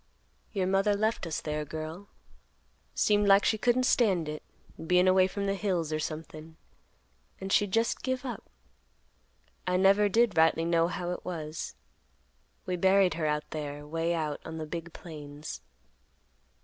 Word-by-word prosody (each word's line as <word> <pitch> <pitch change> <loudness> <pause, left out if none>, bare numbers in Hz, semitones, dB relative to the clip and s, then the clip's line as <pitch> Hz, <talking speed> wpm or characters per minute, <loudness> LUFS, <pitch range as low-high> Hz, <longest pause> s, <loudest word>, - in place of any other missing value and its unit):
"Your 190 - 0
mother 195 +2 +2
left 215 -2 0
us 160 - -3
there, 150 0 -3
girl. 160 +6 -7 0.9
Seemed 205 -1 +3
like 195 0 +6
she 220 - +2
couldn't 245 +2 +2
stand 190 -11 +2
it, 150 0 -5 0.4
bein' 180 +2 +3
away 185 0 +5
from 200 +1 -4
the 195 - +1
hills 180 -6 -1
or 155 - 0
somethin', 155 0 -6 0.8
and 195 0 -5
she 205 - +4
just 225 +4 0
give 260 0 -2
up. 240 -5 -6 1.2
I 180 0 +2
never 200 +2 +4
did 230 +2 +3
rightly 160 0 +4
know 170 0 +3
how 175 0 -3
it 180 - -5
was. 155 - -5 0.9
We 180 -1 -2
buried 190 +1 +4
her 160 -2 -1
out 150 0 -2
there, 145 -1 -5
way 165 +2 -1
out 155 -3 -3
on 160 0 -7
the 160 - -4
big 170 +2 -6
plains." 150 - -9
175 Hz, 155 wpm, -29 LUFS, 155-200 Hz, 1.2 s, like